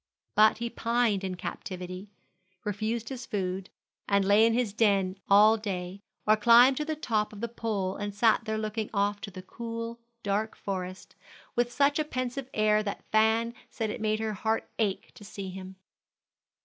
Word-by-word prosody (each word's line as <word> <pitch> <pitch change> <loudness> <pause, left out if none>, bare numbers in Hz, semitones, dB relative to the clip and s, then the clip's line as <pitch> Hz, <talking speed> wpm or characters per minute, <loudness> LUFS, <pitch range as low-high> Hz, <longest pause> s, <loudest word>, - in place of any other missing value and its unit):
But 215 +1 +5
he 235 +1 -3
pined 230 -4 +1
in 185 -1 -3
captivity, 185 +1 -6 0.5
refused 215 +2 -2
his 255 -3 -6
food, 190 -1 -3 0.4
and 200 -1 +3
lay 205 +3 +6
in 230 - +2
his 240 -5 0
den 200 -4 +2
all 210 +3 +7
day, 190 -2 -5 0.2
or 215 - +6
climbed 240 +4 +6
to 300 - -1
the 315 0 -2
top 220 -8 -1
of 210 - -10
the 235 - -2
pole 210 -5 -2
and 205 0 -3
sat 220 +2 +3
there 220 -1 -1
looking 215 0 -3
off 205 +1 +1
to - - -6
the 185 -1 -9
cool, 230 +3 -6 0.2
dark 210 +2 -1
forest, 185 -1 -5 0.4
with 240 0 +1
such 285 +3 +2
a - - +3
pensive 255 -2 -4
air 215 0 +3
that 200 -1 -5
Fan 220 +2 +3 0.2
said 220 -2 -3
it 225 - -6
made 215 0 +1
her 220 -1 -2
heart 220 +2 -1
ache 205 -4 -1
to - - -14
see 200 -1 -7
him. 190 0 -9
215 Hz, 175 wpm, -28 LUFS, 200-230 Hz, 0.5 s, all